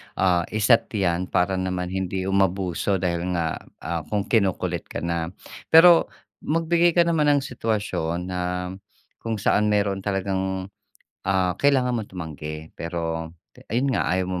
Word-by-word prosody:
ah, 90 -2 +2
i-set 110 +2 +3
'yan 90 -2 0
para 95 +1 +1
naman 90 -1 -2
hindi 95 0 -2
umabuso 95 0 +1
dahil 90 -1 -1
nga, 80 -2 -1 0.2
ah, 85 -2 -3
kung 105 +2 -1
kinukulit 100 -3 0
ka - - -6
na. 85 -1 -1 0.4
Pero 165 +1 +7 0.3
magbigay 165 +2 +2
ka 170 - +6
naman 165 -3 +2
ng 140 - 0
sitwasyon 95 -8 -2
na 90 - -2 0.8
kung 115 -1 -3
saan 105 +1 +2
meron 100 -2 +1
talagang, 95 -1 -2 0.6
ah, 95 -2 +2
kailangan 135 -3 +3
mong 110 -4 -3
tumanggi 80 -3 -7
pero, 80 -1 -4 0.4
ayun 130 +5 +1
nga - - 0
ayaw 95 +1 +1
mong 90 -1 -3
95 Hz, 140 wpm, -24 LUFS, 90-110 Hz, 0.8 s, Pero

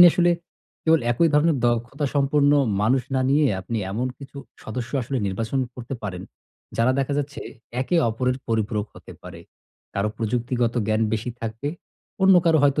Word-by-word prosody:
আপনি - - +12
আসলে 175 +1 +3 0.5
কেবল 160 0 +4
একই 165 +8 +3
ধরনের 150 +1 +4
দক্ষতা 120 +5 -1
সম্পন্ন 145 0 +3 0.3
মানুষ 125 +4 +3
না 130 - +2
নিয়ে, 145 +1 +4
আপনি 115 +5 -3
এমন 115 +6 -1
কিছু 140 0 -12 0.3
সদস্য 120 +2 -5
আসলে 130 +3 -3
নির্বাচন 110 +7 -2 0.2
করতে 125 +2 -6
পারেন 90 -3 -5 0.5
যারা 115 +3 +3
দেখা 135 +1 0
যাচ্ছে, 145 0 -4 0.4
একে 155 +7 +1
অপরের 125 +3 0
পরিপূরক 110 -2 0
হতে - - -12
পারে। - - -10 0.5
কারো 100 +2 0
প্রযুক্তিগত 120 +1 0
জ্ঞান 110 0 +1
বেশি 110 +2 -1
থাকবে। 115 +5 -4 0.5
অন্য 190 0 +7
কারো 165 -2 +4
হয়তো 145 +1 +3
125 Hz, 160 wpm, -24 LUFS, 115-145 Hz, 0.5 s, আপনি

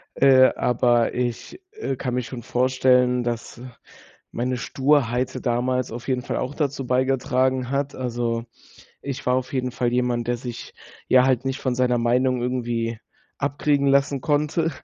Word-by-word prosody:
äh, 130 -1 +6
aber 120 -1 +2
ich, 125 - -4
äh, 280 - -3
kann 125 -1 -3
mir 125 - -1
schon 120 +1 -7
vorstellen, 125 0 +2
dass 120 0 -5 0.7
meine 125 +1 -2
Sturheit 130 -2 0
damals 125 +1 0
auf 120 +3 -8
jeden 125 -2 -1
Fall - - -3
auch 130 +3 -3
dazu 140 -4 -2
beigetragen 130 0 +1
hat. 140 +1 -1
Also, 120 -2 -2 0.6
ich 140 -2 -6
war 125 - +3
auf 130 +1 -2
jeden 125 -1 -2
Fall 120 -1 -1
jemand, 120 -1 0
der 120 - +1
sich, 120 -1 -8 0.4
ja, 130 0 +6
halt 130 -1 +1
nicht 135 +1 -2
von 130 -2 -1
seiner 125 -1 +1
Meinung 125 +1 +1
irgendwie 120 -2 -2 0.4
abkriegen 140 0 +1
lassen 140 0 +2
konnte 150 +2 0
125 Hz, 155 wpm, -23 LUFS, 120-135 Hz, 0.7 s, äh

